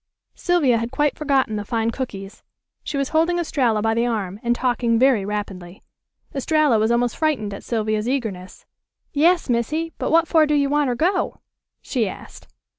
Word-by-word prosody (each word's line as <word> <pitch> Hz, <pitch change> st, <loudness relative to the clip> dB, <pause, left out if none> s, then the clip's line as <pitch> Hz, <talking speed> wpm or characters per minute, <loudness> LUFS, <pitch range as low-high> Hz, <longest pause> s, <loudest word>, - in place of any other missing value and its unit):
Sylvia 295 Hz, -10 st, +2 dB
had 230 Hz, +1 st, -3 dB
quite 295 Hz, +2 st, +1 dB
forgotten 270 Hz, -7 st, 0 dB
the 205 Hz, -, -3 dB
fine 225 Hz, +2 st, -1 dB
cookies. 215 Hz, -5 st, -7 dB, 0.4 s
She 295 Hz, -, -4 dB
was 275 Hz, -1 st, -1 dB
holding 330 Hz, +2 st, +2 dB
Estralla 250 Hz, -10 st, 0 dB
by 225 Hz, 0 st, +2 dB
the 235 Hz, +1 st, +1 dB
arm, 205 Hz, -4 st, -3 dB
and 240 Hz, 0 st, +1 dB
talking 240 Hz, -2 st, +1 dB
very 255 Hz, -4 st, +3 dB
rapidly. 195 Hz, -3 st, -6 dB, 0.5 s
Estralla 290 Hz, -3 st, +2 dB
was 220 Hz, +1 st, +2 dB
almost 235 Hz, 0 st, +1 dB
frightened 270 Hz, -11 st, -1 dB
at 200 Hz, -, -8 dB
Sylvia's 215 Hz, 0 st, -1 dB
eagerness. 215 Hz, -9 st, -4 dB, 0.5 s
"Yas, 335 Hz, +4 st, +3 dB
Missy; 300 Hz, +7 st, -1 dB
but -, -, -1 dB
what 330 Hz, +1 st, +4 dB
for 315 Hz, -2 st, +4 dB
do 300 Hz, -, +2 dB
you 280 Hz, -1 st, +2 dB
wanter 290 Hz, -4 st, +1 dB
go?" 365 Hz, +8 st, 0 dB, 0.4 s
she 230 Hz, -7 st, -1 dB
asked. -, -, -11 dB
245 Hz, 170 wpm, -22 LUFS, 220-295 Hz, 0.5 s, what